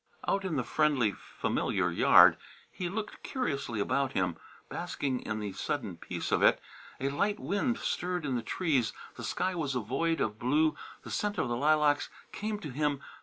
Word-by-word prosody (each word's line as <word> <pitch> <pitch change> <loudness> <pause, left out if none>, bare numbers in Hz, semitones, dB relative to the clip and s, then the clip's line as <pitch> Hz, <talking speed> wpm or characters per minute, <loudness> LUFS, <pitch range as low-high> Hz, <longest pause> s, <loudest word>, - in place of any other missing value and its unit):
Out 195 - +1
in 175 -4 -1
the 130 - +1
friendly, 140 -6 +2
familiar - - -1
yard, - - +7 0.4
he 180 -1 -3
looked 210 +3 -5
curiously 140 - -2
about 135 +6 0
him, 90 -2 0 0.3
basking 130 -3 -2
in 105 -1 -4
the 105 -2 -4
sudden 110 -8 -3
peace - - -5
of - - +3
it. - - +5 0.4
A 135 - 0
light 200 +9 0
wind 220 +5 0
stirred 180 -2 -2
in 135 -3 0
the 120 - 0
trees, 135 - 0 0.2
the - - -9
sky 185 0 -1
was 150 -6 -2
a - - +2
void 135 +9 0
of 105 0 -1
blue, 150 +5 +2 0.3
the - - -8
scent 205 0 -1
of 125 - 0
the 120 - 0
lilacs 150 +2 +3 0.2
came 215 +1 -3
to 150 - -6
him. 145 +1 0
145 Hz, 180 wpm, -30 LUFS, 125-175 Hz, 0.4 s, yard